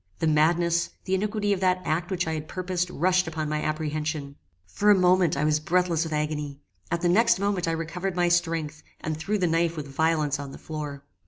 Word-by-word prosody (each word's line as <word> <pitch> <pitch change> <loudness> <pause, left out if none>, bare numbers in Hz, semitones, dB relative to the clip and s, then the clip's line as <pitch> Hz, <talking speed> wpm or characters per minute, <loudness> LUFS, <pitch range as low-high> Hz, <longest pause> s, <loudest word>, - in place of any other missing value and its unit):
The - - -1
madness, 170 +2 +2 0.2
the 190 - -2
iniquity 205 +1 0
of 195 - -2
that 185 -1 +2
act 170 +3 -1
which 185 -2 -1
I 160 - -1
had 155 -1 -4
purposed 180 0 -2
rushed 185 +1 +2
upon 155 -1 -3
my 150 0 -1
apprehension. 155 -2 -3 0.3
For 200 - +1
a 205 - +8
moment 180 -4 +3
I 145 - 0
was 150 0 +2
breathless 170 0 +1
with 160 - -6
agony. 150 -2 -2 0.3
At 170 -1 -1
the 175 - +2
next 220 +6 +4
moment 195 -3 -1
I 165 - +1
recovered 175 +3 -3
my 175 -1 +2
strength, 165 -3 0 0.2
and 155 0 -3
threw 200 +7 -1
the 185 - +1
knife 165 0 +1
with 145 -2 -5
violence 150 0 +1
on 140 -1 -7
the - - -9
floor. 150 -3 -6
165 Hz, 215 wpm, -26 LUFS, 155-180 Hz, 0.3 s, a